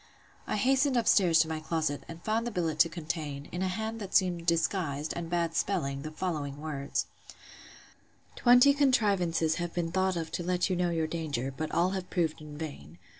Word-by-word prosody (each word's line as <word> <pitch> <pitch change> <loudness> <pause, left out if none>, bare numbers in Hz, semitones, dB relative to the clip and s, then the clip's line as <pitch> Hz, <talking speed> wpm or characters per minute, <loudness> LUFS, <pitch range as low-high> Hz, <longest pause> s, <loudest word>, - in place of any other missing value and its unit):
I - - -1
hastened 265 +4 +2
up 230 - +1
stairs 175 -5 +5
to 160 - 0
my 160 -1 -3
closet, 155 -2 -2
and 165 0 -10
found 225 +2 0
the - - -3
billet 165 -5 -2
to 165 - +6
contain, 155 -4 -5
in 175 - -4
a 190 - +1
hand 220 +4 -3
that 195 -2 -6
seemed 175 -3 +2
disguised, 165 -3 0
and 170 -1 -5
bad 170 -1 0
spelling, 150 -7 -1
the 155 - -5
following 155 -4 -3
words: 145 -3 -3 1.3
'Twenty 250 +3 +6
contrivances 200 - +2
have 175 -1 -4
been 170 -2 -1
thought 190 +1 +1
of 165 -1 -4
to - - -3
let 180 +1 0
you - - +2
know 175 0 +1
your 165 -2 0
danger: 145 -6 -3
but 155 +2 -4
all 175 +2 +2
have 190 -2 -4
proved 165 -4 -1
in 150 -1 -9
vain. 85 - -8
170 Hz, 195 wpm, -29 LUFS, 155-190 Hz, 1.3 s, to